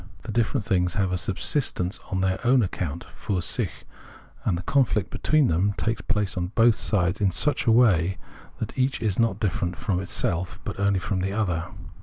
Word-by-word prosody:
The 115 - -5
different 110 -1 0
things 90 0 +1
have 100 -3 +1
a 90 - 0
subsistence 95 - 0
on 95 -2 -1
their 95 0 0
own 125 0 +4
account 85 -3 -3
{fur 95 -3 -4
sich); - - 0 0.7
and 90 - +1
the 90 - -6
conflict 110 -7 +1
between 155 -2 +2
them 95 +2 +1
takes 115 0 -1
place 105 -4 -1
on 90 -1 -1
both 115 0 +6
sides 95 -2 0
in 100 - +4
such 140 +10 +1
a - - +6
way 95 -6 +4 0.4
that - - -5
each 130 +1 0
is 105 -3 -1
not 115 -3 +2
different 90 -4 -1
from 95 -5 -1
itself, 90 -1 -2
but - - -5
only 100 -1 +2
from 95 +1 -2
the 95 +2 -2
other. 90 -6 -1
100 Hz, 190 wpm, -25 LUFS, 90-115 Hz, 0.7 s, both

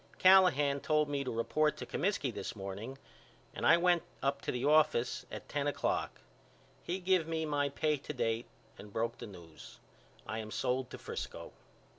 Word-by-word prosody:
Callahan 180 -7 +6
told 150 0 +1
me 140 -1 -1
to 130 - -4
report 150 +7 +1
to - - -6
Comiskey 175 - -1
this 100 - -5
morning 100 +6 -6 0.6
and - - -1
I 165 - +8
went 175 -1 +3 0.2
up 140 0 0
to - - -2
the 125 +2 -2
office 150 -5 +3
at - - -7
ten 145 -1 -1
o'clock. 145 - -1 0.6
He 175 - -2
give 185 -3 +2
me 160 -1 -1
my 145 -2 0
pay 150 +2 0
to 140 - -7
date 115 -2 -1 0.3
and 105 0 -10
broke 115 +2 -2
the - - -7
news. 80 - -12 0.5
I 110 +1 -4
am 110 -1 -6
sold 125 +3 -1
to - - -8
Frisco. - - -6
140 Hz, 175 wpm, -33 LUFS, 115-155 Hz, 0.6 s, I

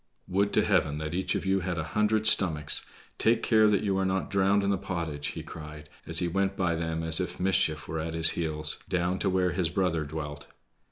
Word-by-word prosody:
"Would 100 +2 +1
to 105 - +3
Heaven 80 -7 +1
that 75 0 -4
each 95 +1 -1
of - - -3
you 95 0 +2
had 90 -1 -3
a 80 - -1
hundred 105 0 +1
stomachs! 80 -8 +3 0.3
Take 115 0 +2
care 110 -1 +4
that 105 -2 +2
you 95 -2 0
are - - +1
not 95 0 -1
drowned 100 0 +2
in 100 - +1
the 100 - +1
pottage," 80 -6 -4
he - - -5
cried 75 -1 -10 0.2
as - - +2
he 90 - +2
went 95 +2 -1
by 90 -4 +1
them 80 0 -3
as 80 +1 +3
if 90 -1 -4
mischief 90 -5 +1
were 80 - -3
at 80 +1 -4
his 80 0 +4
heels, 75 -2 -1
down 90 +1 0
to 100 - 0
where 90 -1 +1
his 90 -3 0
brother 85 -3 0
dwelt. 75 -1 -7
90 Hz, 225 wpm, -28 LUFS, 80-95 Hz, 0.3 s, care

